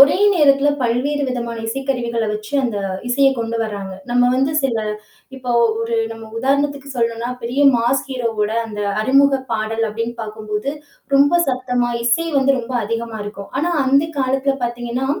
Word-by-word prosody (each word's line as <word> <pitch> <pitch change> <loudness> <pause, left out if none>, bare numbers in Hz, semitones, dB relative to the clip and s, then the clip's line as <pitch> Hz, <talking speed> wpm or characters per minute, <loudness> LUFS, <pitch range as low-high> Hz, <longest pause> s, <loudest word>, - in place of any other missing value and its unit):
ஒரே 280 +4 +7 0.2
நேரத்தில 285 -3 +4
பல்வேறு 265 +5 0
விதமான 235 -2 -3
இசைக்கருவிகள 240 -2 -1
வெச்சு 215 +4 -6
அந்த 225 -4 -1 0.3
இசையை 270 +2 +4
கொண்டு 230 0 -2
வரங்க. 200 -3 -5 0.2
நம்ம் 245 0 +3
வந்து 270 +3 +1
சில, 260 -4 +1 0.6
இப்போ 250 -2 -3 0.3
ஒரு 230 0 -1 0.2
நம்ம 225 -1 -10
உதாரணத்திற்கு 280 +2 0
சொல்லனும்னா, 235 0 -1
பெரிய 250 +4 -1 0.2
மாஸ் 240 +3 +1
ஹீரோ 250 -3 -1
ஓட 210 - 0 0.2
அந்த 210 -2 -5 0.2
அறிமுக 275 +3 +4
பாடல் 225 +1 -1
அப்படின்னு 230 +2 -3
பாக்கும்போது, 215 +3 -4 0.4
ரொம்ப 280 +2 +5 0.2
சத்தமா 250 -2 0
இசை 285 +8 +2
வந்து 270 0 +3
ரொம்ப 245 +1 -5
அதிகமா 230 +1 -3
இருக்கும். 200 -1 -8
ஆனா, 345 +2 0
அந்த 275 +3 +4
காலத்தில, 270 +1 +1
பாத்தீங்கன்னா, 240 +2 -3
245 Hz, 150 wpm, -19 LUFS, 230-270 Hz, 0.6 s, ஒரே